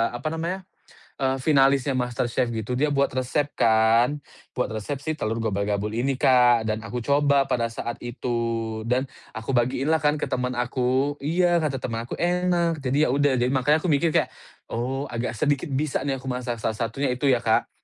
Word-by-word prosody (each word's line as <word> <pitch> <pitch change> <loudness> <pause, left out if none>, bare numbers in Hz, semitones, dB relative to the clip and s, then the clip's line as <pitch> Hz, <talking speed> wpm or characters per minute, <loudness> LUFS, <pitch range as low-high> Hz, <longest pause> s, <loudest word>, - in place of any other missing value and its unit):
apa 155 +6 -3
namanya, 170 +4 -3 0.6
eee, 135 0 +1
finalisnya 135 -1 +3
MasterChef 125 -1 -1
gitu 115 +1 -3
dia 145 +4 +1
buat 140 -2 +1
resep 135 +3 -1
kan, 115 +5 +3 0.4
buat 125 -2 -1
resep 110 +6 -4
si 155 - 0
telur 115 -6 -2
gobal-gabul 105 -1 -1
ini 130 +3 0
Kak, 125 -3 +4
dan 110 0 -2
aku 115 +2 -6
coba 140 -1 +3
pada 120 -3 0
saat 120 +1 -6
itu, 115 -2 -3
dan 130 +2 +1 0.3
aku 110 +4 -4
bagiinlah 130 +6 +1
kan 150 +1 +2
ke - - -2
temen 125 0 -2
aku 130 +3 0
iya, 170 +3 +2
kata 145 -4 -1
temen 115 -3 -4
aku - - -4
enak. 175 -2 +1
Jadi 140 +3 +2
ya 125 - 0
udah, 145 -2 +2
jadi 125 +2 +1
makanya 145 +5 +2
aku - - +1
mikir 165 +4 +2
kayak, - - +1 0.4
oh 130 +4 -2
agak 115 -1 -3
sedikit 145 +4 0
bisa 140 +1 -1
nih 135 -1 -1
aku 130 - -13
masak, 125 -2 -3
salah 110 0 -2
satunya 125 +4 -1
itu 130 +3 0
ya 130 - +5
Kak, 115 -2 +1
130 Hz, 185 wpm, -24 LUFS, 120-145 Hz, 0.6 s, ya